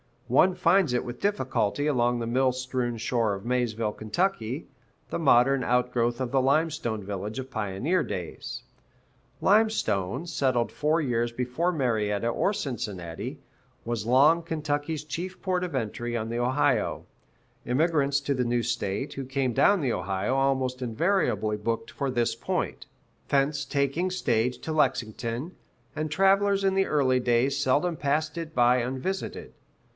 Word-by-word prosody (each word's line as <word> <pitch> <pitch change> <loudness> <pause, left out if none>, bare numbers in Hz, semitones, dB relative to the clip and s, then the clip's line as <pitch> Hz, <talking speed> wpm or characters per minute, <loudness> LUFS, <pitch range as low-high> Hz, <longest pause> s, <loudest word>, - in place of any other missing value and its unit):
One 185 -1 +4
finds 180 -5 +3
it 125 - +1
with 120 0 -7
difficulty 145 - 0
along 120 -4 +2
the 115 - -2
mill 130 +2 +2
strewn 125 -2 -2
shore 115 -2 0
of 100 - -9
Maysville, 115 -3 0
Ky., 125 - -2 0.4
the - - -3
modern 135 -3 +4
outgrowth 120 0 +1
of 125 -2 -2
the 135 - +3
Limestone 135 -6 0
village 100 +3 -5
of 130 0 -6
pioneer 110 - 0
days. - - -5 0.8
Limestone, 175 - +2
settled 135 -7 0
four 155 +3 +1
years 120 -4 0
before 125 +9 -1
Marietta 115 - 0
or 155 - +1
Cincinnati, 100 - -5 0.4
was 115 -3 -3
long 140 +8 +5
Kentucky's 155 -1 -2
chief 170 +5 -5
port 180 -1 0
of 170 -6 -5
entry 120 0 -3
on 110 0 -3
the 120 +1 -2
Ohio; 130 -2 +1 0.6
immigrants 140 0 +2
to 140 0 0
the 125 -2 0
new 120 0 +1
state, 115 +2 -2
who 135 - -5
came 135 -1 -1
down 200 - +4
the 130 -5 0
Ohio, 95 +5 -1
almost 135 -1 0
invariably 120 - 0
booked 115 +2 -3
for 140 - -2
this 120 -2 0
point, - - -3 0.4
thence 140 0 +1
taking 140 +6 0
stage 125 -9 0
to 160 - -5
Lexington, 125 - -1 0.4
and 155 +1 -3
travelers 195 +3 +3
in 195 -1 +3
the 195 0 +2
early 130 -4 +2
day 120 +1 +2
seldom 145 +5 +1
passed 150 +2 -1
it 165 -1 -6
by 125 0 +5
unvisited. 130 +10 -3
130 Hz, 145 wpm, -27 LUFS, 120-155 Hz, 0.8 s, long